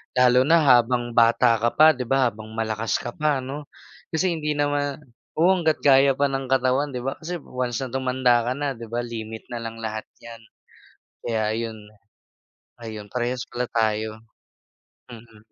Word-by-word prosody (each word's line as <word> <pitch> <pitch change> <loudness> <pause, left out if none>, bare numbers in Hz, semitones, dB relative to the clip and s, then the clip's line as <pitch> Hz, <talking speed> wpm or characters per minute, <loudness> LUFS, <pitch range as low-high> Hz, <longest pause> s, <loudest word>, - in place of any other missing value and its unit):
Lalo 125 0 +5
na 165 -1 +5
habang 120 -2 +3
bata 115 0 +4
ka 120 +1 0
pa 155 +1 +7
'di 125 -5 -5
ba, 135 -2 +3
habang 110 +1 -11
malakas 110 -1 -1
ka 120 - -4
pa 145 -3 0
'no. 145 +2 -7 0.5
Kasi 180 +3 +1
hindi 150 -2 -2
nama 145 -1 0 0.4
oo, 175 +4 +5
hangga't 160 -2 0
kaya 135 -1 +5
pa 140 0 +1
ng 135 -1 -3
katawan 130 +2 +2
'di 125 - -3
ba, 135 +1 -2
kasi 175 +2 -5
once 125 -1 -3
na 130 - -6
tumanda 125 -2 +2
ka 125 - +1
na 145 -1 -1
'di 115 -1 -10
ba, 120 +1 -2
limit 110 -2 -7
na 120 - -4
lang 115 0 -6
lahat 110 0 -4 0.2
'yan, 115 -1 -10 0.8
kaya 110 -2 0
yun. 115 -1 -4 1.0
Ayun, 110 -2 -7
parehas 125 +1 -2
pala 125 0 -2
tayo. 110 -1 -1 0.9
Mhm. 115 -2 -13
125 Hz, 170 wpm, -23 LUFS, 115-135 Hz, 1.0 s, pa